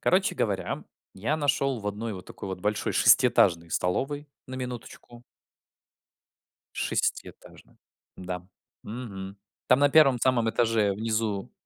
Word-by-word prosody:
Короче -, -, +2 dB
говоря, -, -, -2 dB, 0.3 s
я 110 Hz, +11 st, -1 dB
нашел 140 Hz, -3 st, +1 dB
в 105 Hz, -, -7 dB
одной 105 Hz, +2 st, -3 dB
вот 95 Hz, -1 st, -10 dB
такой -, -, -8 dB
вот 95 Hz, -1 st, -5 dB
большой 105 Hz, +2 st, -1 dB
шестиэтажной 85 Hz, 0 st, +4 dB
столовой, 145 Hz, -, -1 dB, 0.2 s
на 130 Hz, -, -7 dB
минуточку 125 Hz, -1 st, -8 dB, 1.5 s
шестиэтажной. -, -, -4 dB, 0.4 s
Да, 90 Hz, -1 st, -6 dB, 0.4 s
мгм. 100 Hz, -4 st, -7 dB, 0.3 s
Там 125 Hz, -, +5 dB
на 145 Hz, 0 st, +5 dB
1 140 Hz, -4 st, +5 dB
самом 120 Hz, -2 st, +2 dB
этаже 110 Hz, -3 st, +2 dB
внизу 110 Hz, -1 st, -2 dB
115 Hz, 120 wpm, -27 LUFS, 100-130 Hz, 1.5 s, Там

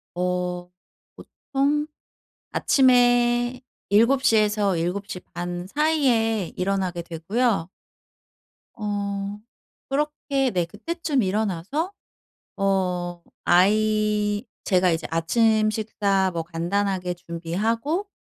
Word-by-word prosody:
어 180 Hz, 0 st, -2 dB, 0.5 s
보통 285 Hz, +2 st, -1 dB, 0.7 s
아침에 245 Hz, -1 st, +3 dB, 0.3 s
7 235 Hz, +6 st, +4 dB
시에서 210 Hz, -5 st, +3 dB
7 180 Hz, +5 st, -2 dB
시 180 Hz, -, -5 dB
반 175 Hz, +1 st, -4 dB
사이에 240 Hz, -, +1 dB
일어나게 185 Hz, -2 st, -1 dB
되고요. 175 Hz, +4 st, -1 dB, 1.1 s
어 200 Hz, -1 st, -3 dB, 0.5 s
그렇게 280 Hz, -1 st, 0 dB
네 180 Hz, -4 st, 0 dB
그때쯤 285 Hz, -, -2 dB
일어나서 210 Hz, -, -1 dB, 0.7 s
어 180 Hz, -3 st, 0 dB, 0.2 s
아이 210 Hz, +3 st, +2 dB, 0.2 s
제가 185 Hz, -2 st, +3 dB
이제 165 Hz, 0 st, -2 dB
아침 215 Hz, +6 st, +3 dB
식사 200 Hz, -3 st, 0 dB
뭐 165 Hz, -1 st, -2 dB
간단하게 180 Hz, +2 st, -1 dB
준비하고 210 Hz, -, -2 dB
205 Hz, 175 characters per minute, -24 LUFS, 180-240 Hz, 1.1 s, 7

